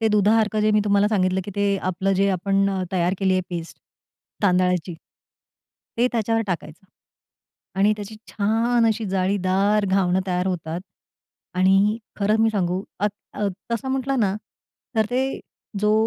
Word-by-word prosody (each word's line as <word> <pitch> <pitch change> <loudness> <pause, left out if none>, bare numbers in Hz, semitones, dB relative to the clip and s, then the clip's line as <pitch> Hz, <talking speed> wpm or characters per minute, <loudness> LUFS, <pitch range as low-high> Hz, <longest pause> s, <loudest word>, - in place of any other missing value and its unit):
ते 225 - +2
दुधासारखं 215 +1 +3
जे 215 0 +3
मी 210 0 +3
तुम्हाला 205 0 +3
सांगितलं 190 -3 +1
की 205 - -6
ते 200 -1 +2
आपलं 185 +2 0
जे 195 +1 +2
आपण 195 +2 +1
अ, 190 -1 -2
तयार 180 0 +1
केली 190 -1 +2
आहे 185 - +2
पेस्ट 170 -1 -6 0.6
तांदळाची. 180 -2 +2 1.0
ते 240 +2 +3
त्याच्यावर 225 0 +1
टाकायचं. 170 -1 -5 0.9
आणि 205 +2 +4
त्याची 210 +1 -8
छान 230 +3 +1
अशी 220 0 0
जाळीदार 195 +2 +1
घावणं 190 -1 +2
तयार 180 0 0
होतात 170 -2 -3 0.8
आणि 195 +4 +3 0.2
खरं 210 +1 +2
मी 225 0 +4
सांगू 185 -3 -1 0.2
अ, 210 - +3 0.3
अ, 205 - -1 0.2
तसं 250 +3 -2
म्हटलं 265 0 -1
ना 195 -3 +2 0.6
तर 220 - +4
ते 260 +2 -1 0.4
जो 210 0 +3
200 Hz, 150 wpm, -23 LUFS, 185-215 Hz, 1.0 s, आणि